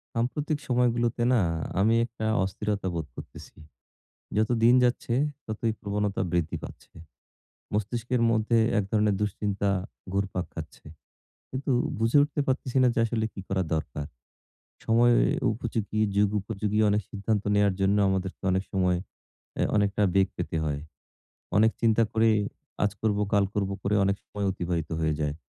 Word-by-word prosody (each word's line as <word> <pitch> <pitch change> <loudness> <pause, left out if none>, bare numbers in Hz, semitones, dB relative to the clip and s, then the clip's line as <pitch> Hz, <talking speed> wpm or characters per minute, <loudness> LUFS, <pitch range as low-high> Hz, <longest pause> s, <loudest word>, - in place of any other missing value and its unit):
সাম্প্রতিক 145 +6 -1
সময়গুলোতে 120 -1 +1
না, 120 - +4 0.4
আমি 110 +3 +4
একটা 115 -2 -6 0.2
অস্থিরতা 100 +1 -2
বোধ 80 -2 -2
করতেছি। - - -11 0.8
যতো 110 +3 +2
দিন 120 - +7
যাচ্ছে, 120 -1 0 0.3
ততোই 110 +1 -1
প্রবণতা 100 0 -2
বৃদ্ধি 85 -2 0
পাচ্ছে। - - -11 0.8
মস্তিষ্কের 115 +4 -1
মধ্যে 115 +1 +2 0.2
এক - - 0
ধরনের 105 -2 +2
দুশ্চিন্তা, 100 -1 -1 0.4
ঘুরপাক 100 -2 -1
খাচ্ছে। 80 -4 -9 0.7
কিন্তু 130 +1 -2 0.3
বুঝে 115 +5 +3
উঠতে 145 0 -1
পারতেছিনা 130 -1 +1
যে - - -1
আসলে 110 -1 -1
কি - - -7
করা 95 -1 0
দরকার। 75 -1 -3 0.8
সময় 120 +2 +4 0.4
উপযোগী, 110 -2 -3 0.2
যুগ 105 0 +4
উপযোগী 105 +2 -2
অনেক 105 +1 +2
সিদ্ধান্ত 105 0 -1
নেওয়ার 100 -1 +3
জন্য 95 +1 +3
আমাদেরকে 95 0 -2
অনেক 95 +1 +1
সময় 90 -2 +2 0.6
অ্যা - - +1
অনেকটা 100 0 +2
বেগ 95 -1 +5
পেতে - - -3
হয়। 75 -2 -2 0.8
অনেক 110 +2 +5
চিন্তা 115 -1 +4
করে, 115 0 +3 0.6
আজ 105 - +2
করবো, 105 -2 +1
কাল 100 -2 +4
করবো 100 -1 -1
করে 100 - 0
অনেক 100 0 +1
সময় 100 -1 -5
অতিবাহিত 85 -3 -3
হয়ে 80 -1 +1
যায়। 75 -1 -1
105 Hz, 140 wpm, -27 LUFS, 95-115 Hz, 0.8 s, দিন